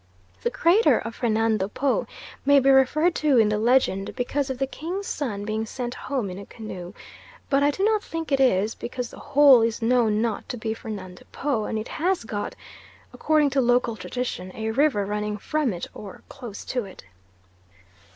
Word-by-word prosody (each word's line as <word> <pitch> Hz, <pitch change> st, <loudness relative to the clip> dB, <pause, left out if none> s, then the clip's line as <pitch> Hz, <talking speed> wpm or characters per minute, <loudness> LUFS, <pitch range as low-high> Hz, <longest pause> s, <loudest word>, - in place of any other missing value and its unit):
The -, -, 0 dB
crater 365 Hz, +8 st, +4 dB
of 230 Hz, -, -5 dB
Fernando 220 Hz, -4 st, +1 dB
Po 265 Hz, +6 st, 0 dB, 0.4 s
may 285 Hz, 0 st, +6 dB
be 275 Hz, +1 st, +4 dB
referred 300 Hz, +6 st, +4 dB
to 295 Hz, -4 st, +3 dB
in 220 Hz, -2 st, +5 dB
the 210 Hz, 0 st, 0 dB
legend 225 Hz, -4 st, +2 dB
because 270 Hz, +2 st, -1 dB
of 260 Hz, -, -3 dB
the 270 Hz, -, 0 dB
king's 345 Hz, +9 st, -5 dB
son 215 Hz, -, -3 dB
being 215 Hz, +1 st, -2 dB
sent 245 Hz, +1 st, -4 dB
home 255 Hz, -9 st, -3 dB
in 180 Hz, -, -7 dB
a 200 Hz, -, -9 dB
canoe; 190 Hz, -5 st, -8 dB, 0.6 s
but 275 Hz, 0 st, +4 dB
I 285 Hz, -, +4 dB
do 380 Hz, +7 st, -2 dB
not 430 Hz, 0 st, +2 dB
think 330 Hz, -2 st, -5 dB
it 275 Hz, -, +3 dB
is, 220 Hz, -4 st, +3 dB
because 250 Hz, 0 st, -5 dB
the -, -, -12 dB
Hole 285 Hz, -3 st, +6 dB
is 225 Hz, 0 st, 0 dB
known 225 Hz, -2 st, +2 dB
not 225 Hz, -1 st, -2 dB
to 250 Hz, -, -4 dB
be 220 Hz, -1 st, -2 dB
Fernando 195 Hz, -5 st, -8 dB
Po, 265 Hz, -7 st, -1 dB
and 220 Hz, -, -2 dB
it 215 Hz, -, -4 dB
has 360 Hz, 0 st, 0 dB
got, 210 Hz, -2 st, -4 dB, 0.6 s
according 305 Hz, -2 st, +2 dB
to 270 Hz, 0 st, +2 dB
local 245 Hz, -2 st, +2 dB
tradition, 205 Hz, -3 st, -4 dB
a 220 Hz, 0 st, -2 dB
river 255 Hz, -5 st, +2 dB
running 210 Hz, +1 st, -2 dB
from 300 Hz, +3 st, -1 dB
it 175 Hz, -2 st, -5 dB
or 200 Hz, -3 st, -10 dB
close 240 Hz, -7 st, -9 dB
to 250 Hz, -2 st, -2 dB
it. 190 Hz, -, -12 dB
245 Hz, 190 wpm, -24 LUFS, 215-280 Hz, 0.6 s, may